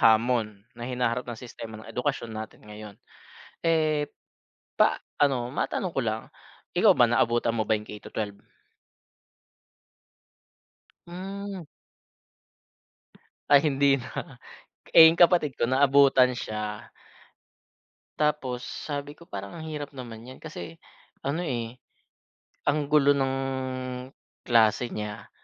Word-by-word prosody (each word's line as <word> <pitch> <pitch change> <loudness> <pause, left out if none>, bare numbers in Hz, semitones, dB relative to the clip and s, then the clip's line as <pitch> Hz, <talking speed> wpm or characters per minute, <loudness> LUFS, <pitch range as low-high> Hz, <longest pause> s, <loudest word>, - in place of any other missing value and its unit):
hamon 110 -2 +3
na 120 +1 -7
hinaharap 125 0 -1
ng 120 - -4
sistema 115 -2 -9
ng 110 - -12
edukasyon 125 -3 -2
natin 110 -1 -8
ngayon. 105 -1 -10 0.6
Eh, 155 -3 +1 0.7
pa - - +3 0.2
ano 135 -4 +2
matanong 165 +6 -2
ko 135 - +2
lang, 110 0 -1 0.5
ikaw - - +6
ba - - +5
naabutan 115 0 +2
mo 110 - +1
ba 110 - -3
yung 105 0 -6
K-12? 105 -1 -6 2.7
Hmm. 195 +2 -6 1.9
Ay 145 -1 +8
hindi 140 -1 +4
na. 120 - -7 0.6
Eh, 160 - +11
yung 170 - -4
kapatid 170 -6 +4
ko - - +2
naabutan 135 -1 +5
siya. 105 -2 -5 1.3
Tapos 150 -5 0
sabi 145 0 -5
ko, 170 - -15
parang 100 - -7
ang 160 - -7
hirap 150 -2 -5
naman 120 -3 -8
niyan. 130 +1 -11
Kasi 160 +1 -8 0.5
ano 140 +5 -1
eh 120 -4 -4 0.9
ang 145 0 +2
gulo 145 -1 +5
ng, 135 -1 0 1.2
klase 115 +1 +4
niya, 105 -1 -6
125 Hz, 115 wpm, -27 LUFS, 110-150 Hz, 2.7 s, Eh